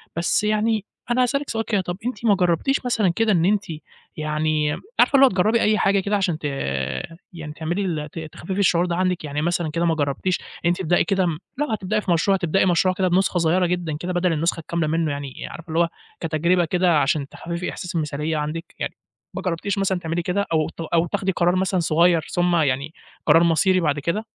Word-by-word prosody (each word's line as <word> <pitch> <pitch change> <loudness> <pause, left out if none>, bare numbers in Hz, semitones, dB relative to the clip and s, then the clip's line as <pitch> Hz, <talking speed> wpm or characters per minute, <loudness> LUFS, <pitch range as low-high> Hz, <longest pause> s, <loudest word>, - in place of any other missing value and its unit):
بس 170 +5 +1
يعني 215 0 +1 0.3
أنا 250 +1 +3
هاسألِك 280 +3 -1
سؤال 225 0 -2
كده، 205 -4 +1
طَب 175 0 -5
أنتِ 240 -2 -4
ما 205 -3 +5
جرّبتيش 180 - +1
مثلًا 220 -6 +2
كده 225 -1 +2
إن 170 -3 +3
أنتِ 205 +1 +2 0.5
يعني 155 0 0 0.3
عارفة - - +5
اللي 275 0 +8
هو 265 - +5
تجرّبي 215 +5 +2
أي 215 0 +3
حاجة 195 0 +3
كده 200 +2 0
عشان 180 -5 0
ت - - -26 0.9
يعني 155 -3 -7
تعملي 175 +5 -2
ال 155 -4 -3
ت - - -7
تخفِّفي 165 +4 -6
الشعور 175 -3 +3
ده 175 - -1
عندِك، 180 -2 0
يعني 150 0 -3
مثلًا 170 -1 0
كده 170 +2 0
ما 165 - +2
جرّبتيش 150 +5 -1
إن - - -15 0.2
أنتِ 175 - +2
تبدئي 175 0 +2
كده 190 -2 +1 0.3
لو 295 +1 0
هتبدئي 210 0 -1
في 185 - -2
مشروع 195 +4 +3
هتبدئي 185 +1 +1
مشروع 185 +1 +3
كده 185 0 +1
بنسخة 185 +1 +2
صغيّرة 175 +2 +2
جدًا 170 -4 -2
كده، 180 +3 -4
بدل 175 -1 +1
النسخة 165 +2 0
الكاملة 165 0 -2
منه، 160 -1 0
يعني 140 -2 -6
عارفة 165 0 -10
اللي 160 +1 0
هو 170 - +3 0.3
كتجربة 170 +2 +1
كده 175 -2 +2
علشان 140 0 0
تخفِّفي 170 +2 -5
إحساس 180 - -6
المثالية 150 0 -1
عندِك؟ 155 +2 -5
يعني - - -3 0.4
ما - - -4
جرّبتيش 185 +3 -2
مثلًا 190 -2 0
تعملي 170 0 -2
كده 190 +4 -1
أو 155 -1 +1
ت - - -19
أو 165 +1 +1
تاخدي 190 +2 -1
قرار 175 0 +1
مثلًا 185 0 +1
صغيّر 170 +1 +3
ثم 175 0 +1
يعني 145 0 0 0.3
قرار 165 - +6
مصيري 185 +3 +3
بعد 150 -3 0
كده؟ 185 +9 -2
175 Hz, 210 wpm, -22 LUFS, 160-190 Hz, 0.9 s, اللي